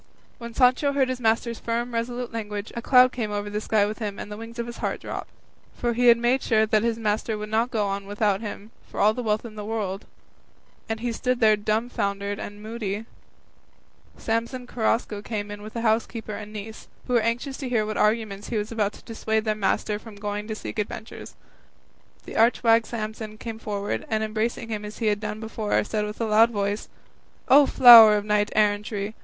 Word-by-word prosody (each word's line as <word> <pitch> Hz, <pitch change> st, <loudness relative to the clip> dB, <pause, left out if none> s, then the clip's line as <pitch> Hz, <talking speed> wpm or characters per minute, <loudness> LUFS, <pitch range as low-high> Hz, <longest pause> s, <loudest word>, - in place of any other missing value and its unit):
When 235 Hz, -1 st, -8 dB
Sancho 260 Hz, +2 st, +3 dB
heard 270 Hz, -2 st, +2 dB
his 255 Hz, -1 st, -3 dB
master's 230 Hz, 0 st, 0 dB
firm, 235 Hz, +1 st, -2 dB
resolute 240 Hz, +1 st, -3 dB
language, 210 Hz, -2 st, -5 dB
a 235 Hz, -, -3 dB
cloud 250 Hz, +1 st, +6 dB
came 225 Hz, -4 st, -3 dB
over 205 Hz, 0 st, -3 dB
the 210 Hz, +1 st, -2 dB
sky 215 Hz, -1 st, +2 dB
with 215 Hz, +3 st, -5 dB
him 205 Hz, -3 st, -4 dB
and 210 Hz, -, -7 dB
the -, -, -5 dB
wings 230 Hz, +1 st, -9 dB
of 235 Hz, -, -2 dB
his 235 Hz, 0 st, -8 dB
heart -, -, -2 dB
drooped, -, -, -6 dB, 0.5 s
for 240 Hz, -1 st, -1 dB
he 245 Hz, +1 st, +2 dB
had 235 Hz, -1 st, +8 dB
made 240 Hz, +3 st, +1 dB
sure 220 Hz, -1 st, +3 dB
that 215 Hz, 0 st, +2 dB
his 230 Hz, 0 st, 0 dB
master 215 Hz, 0 st, -1 dB
would 210 Hz, 0 st, -6 dB
not 225 Hz, +3 st, +1 dB
go 205 Hz, -4 st, 0 dB
without 205 Hz, 0 st, -1 dB
him 210 Hz, 0 st, -7 dB, 0.2 s
for -, -, -8 dB
all 210 Hz, +1 st, +5 dB
the 250 Hz, -, -4 dB
wealth 215 Hz, -1 st, -1 dB
of 225 Hz, -, -8 dB
the 210 Hz, -1 st, -7 dB
world; 205 Hz, -3 st, -3 dB, 0.8 s
and 225 Hz, 0 st, -3 dB
as -, -, -9 dB
he 240 Hz, -, 0 dB
stood 250 Hz, +2 st, -1 dB
there 215 Hz, -2 st, +5 dB
dumbfoundered 205 Hz, -2 st, -2 dB
and 205 Hz, 0 st, -8 dB
moody, 215 Hz, -1 st, -4 dB, 1.1 s
Samson 235 Hz, +3 st, -2 dB
Carrasco 225 Hz, -3 st, -1 dB
came 205 Hz, -1 st, -4 dB
in 205 Hz, 0 st, -8 dB
with 215 Hz, +1 st, -9 dB
the 230 Hz, -, -3 dB
housekeeper 225 Hz, -1 st, -1 dB
and 210 Hz, 0 st, -7 dB
niece, 215 Hz, +1 st, -8 dB, 0.2 s
who 250 Hz, -, -3 dB
were 240 Hz, -, +5 dB
anxious 240 Hz, +4 st, -2 dB
to 265 Hz, -3 st, -5 dB
hear 230 Hz, -3 st, +2 dB
by 210 Hz, -, -5 dB
what 215 Hz, -, -3 dB
arguments 210 Hz, -2 st, 0 dB
he 230 Hz, -, -1 dB
was 210 Hz, +1 st, -3 dB
about 210 Hz, -2 st, 0 dB
to -, -, -15 dB
dissuade 220 Hz, -1 st, -2 dB
their 215 Hz, -, +1 dB
master 210 Hz, 0 st, -1 dB
from 220 Hz, -1 st, -12 dB
going 205 Hz, +1 st, -4 dB
to 220 Hz, -, -4 dB
seek 215 Hz, -, -6 dB
adventures. 215 Hz, +2 st, -6 dB, 0.9 s
The -, -, -9 dB
arch 230 Hz, +3 st, +3 dB
wag 230 Hz, -1 st, +4 dB
Samson 215 Hz, -1 st, -5 dB
came 225 Hz, 0 st, -7 dB
forward, 205 Hz, -2 st, -3 dB
and 220 Hz, 0 st, 0 dB
embracing 220 Hz, +1 st, -2 dB
him 210 Hz, -2 st, -4 dB
as 210 Hz, 0 st, -8 dB
he 230 Hz, -, -3 dB
had 210 Hz, -1 st, +2 dB
done 210 Hz, 0 st, -5 dB
before, 220 Hz, -1 st, -1 dB
said 210 Hz, 0 st, -2 dB
with 210 Hz, 0 st, -7 dB
a 230 Hz, -, 0 dB
loud 220 Hz, +1 st, +5 dB
voice, 205 Hz, -1 st, -2 dB, 0.6 s
"O 280 Hz, +1 st, +7 dB
flower 230 Hz, -4 st, +10 dB
of 205 Hz, -, -3 dB
knight 210 Hz, 0 st, +1 dB
errantry! 210 Hz, 0 st, 0 dB
220 Hz, 215 wpm, -25 LUFS, 210-235 Hz, 1.1 s, flower